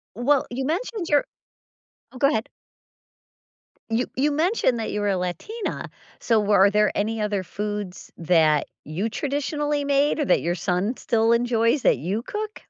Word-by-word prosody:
Well, 265 +4 +2
you 260 +2 -3
mentioned 365 - -2
your 290 -1 +3 0.9
Oh, 255 - -11
go 275 +2 +4
ahead. 220 -7 -1 1.4
You 230 +2 0
you 290 +3 +2
mentioned 310 - +1
that 220 - -3
you 210 - -2
were 205 - 0
a 190 - +1
Latina, 180 - -4 0.3
so 225 -2 +2
were 205 -1 +3
are - - +5
there 210 0 +2
any 220 +1 -1
other 205 -3 -1
foods 205 -2 -5
that 160 -3 +3 0.2
you 175 +9 -3
traditionally 290 +2 -2
made 285 +2 +2
or 295 - +1
that - - +3
your 175 +2 -1
son 185 +7 -1
still 225 -1 +1
enjoys 235 +2 +2
that - - +4
you 190 - -2
cook? 425 - -6
230 Hz, 165 wpm, -24 LUFS, 205-290 Hz, 1.4 s, are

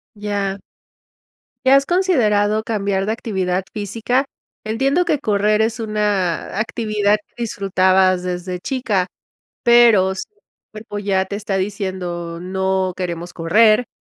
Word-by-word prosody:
Ya. 200 -1 -3 1.1
¿Y - - +5
has 275 +1 +6
considerado 220 - +2
cambiar 200 -3 -1
de 215 - -1
actividad 190 -5 -2
física? 225 +6 -1 0.4
Entiendo 275 +11 +1
que 300 - +1
correr 210 0 +2
es 225 +1 0
una 210 -6 -1
actividad 215 -2 +1
que 240 - -7
disfrutabas 185 -3 +2
desde 180 0 -4
chica, 210 -5 -1 0.6
pero 230 -6 +5
si 190 - -4
el 420 - -37 0.3
cuerpo 215 -1 -7
ya 195 -2 +1
te 195 - -7
está 200 -1 -3
diciendo: 185 -4 -4
"No 190 0 -1
queremos 175 -1 -4
correr", 215 +8 +3
205 Hz, 125 wpm, -19 LUFS, 190-220 Hz, 1.1 s, has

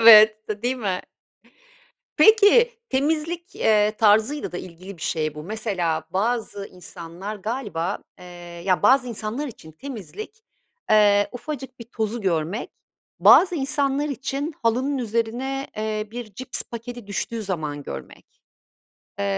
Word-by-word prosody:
Evet, 215 -1 +8
de 210 +1 -4
değil 255 +2 0
mi? 195 -6 -1 1.2
Peki, 450 +2 +7 0.2
temizlik, 320 +6 -1
eee, 210 -1 +3
tarzıyla 220 +5 +3
da 180 - -3
ilgili 185 +2 -10
bir 155 - -12
şey 155 -1 -1
bu. 150 - -7
Mesela, 180 -6 -2
bazı 205 0 -1
insanlar 180 +3 -8
galiba, 205 -5 -3 0.2
eee, - - -12 0.4
ya, 185 -2 +2
bazı 255 +3 +5
insanlar 230 +6 -4
için 160 - -11
temizlik, 280 - -8 0.5
eee, 205 -1 +5
ufacık 265 0 -6
bir 235 - -8
tozu 225 0 -3
görmek, 175 +2 -1 0.5
bazı 360 -1 +7
insanlar 285 0 0
için 275 +3 -3
halının 260 +5 +1
üzerine, 240 +4 -2
eee, 215 0 -2
bir 230 -4 -7
cips 255 +2 -4
paketi 235 -1 -8
düştüğü 220 +2 -3
zaman 155 -7 -3
görmek. - - -10 0.8
Eee, 100 - -1
220 Hz, 125 wpm, -24 LUFS, 200-265 Hz, 1.2 s, Evet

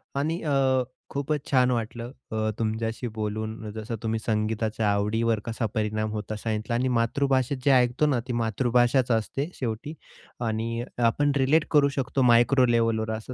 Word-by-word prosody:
आणि 160 +5 -1
अ, 135 -3 +2 0.3
खूपच 140 +1 -2
छान 125 -1 +4
वाटलं 120 +1 -3 0.2
अ, 110 0 0
तुमच्याशी 115 +2 -2
बोलून, 110 +1 -4
जसं 110 +2 -5
तुम्ही 110 0 -1
संगीताच्या 110 0 0
आवडीवर 110 +2 +1
कसा 115 0 -2
परिणाम 110 0 -1
होतो 110 0 -4
सांगितला 110 +1 -2
आणि 125 +2 +1
मातृभाषेत 130 +2 +1
जे 140 - +5
ऐकतो 125 +3 +3
ना, 140 -5 +2
ती 125 - -2
मातृभाषाच 120 +2 +2
असते 135 +7 -1
शेवटी 120 +5 -4 0.5
आणि 115 +2 -2
आपण 120 +5 +2
रिलेट 145 +4 +3
करू 145 -2 +5
शकतो 135 0 0
मायक्रो 125 +2 +5
लेव्हलवर 115 -2 +1
असं 120 +3 -8
115 Hz, 150 wpm, -26 LUFS, 110-130 Hz, 0.5 s, जे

